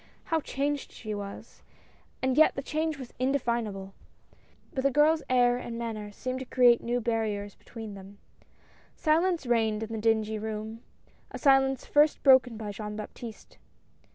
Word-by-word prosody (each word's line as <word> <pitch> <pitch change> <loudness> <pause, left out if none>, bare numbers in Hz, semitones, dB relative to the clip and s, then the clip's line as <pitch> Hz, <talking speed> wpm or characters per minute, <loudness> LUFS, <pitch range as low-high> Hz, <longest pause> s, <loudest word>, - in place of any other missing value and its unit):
How 325 -1 0
changed 285 +1 -2
she 215 -2 -6
was, 200 -1 -8 0.6
and 260 -1 +2
yet 315 +2 +5
the 275 - -4
change 310 +1 -2
was 260 -3 -9
indefinable. 235 -7 -1 0.8
But 265 - -2
the 275 - +4
girl's 300 +3 +4
air 245 -1 +4
and 235 -1 -6
manner 220 -3 -5
seemed 255 +5 -4
to 260 - -6
create 245 -2 +5
new 240 +1 -1
barriers 215 -3 -2
between 225 -3 -9
them. 195 +1 -12 0.8
Silence 330 0 +1
reigned 225 -3 +1
in 220 +1 -6
the 220 - -3
dingy 220 -1 +1
room, 220 +1 -5 0.5
a - - -7
silence 270 -2 +3
first 295 +1 +3
broken 260 -4 +5
by 215 -2 -5
Jean 210 +1 -6
Baptiste. 215 +1 -9
235 Hz, 155 wpm, -28 LUFS, 215-270 Hz, 0.8 s, yet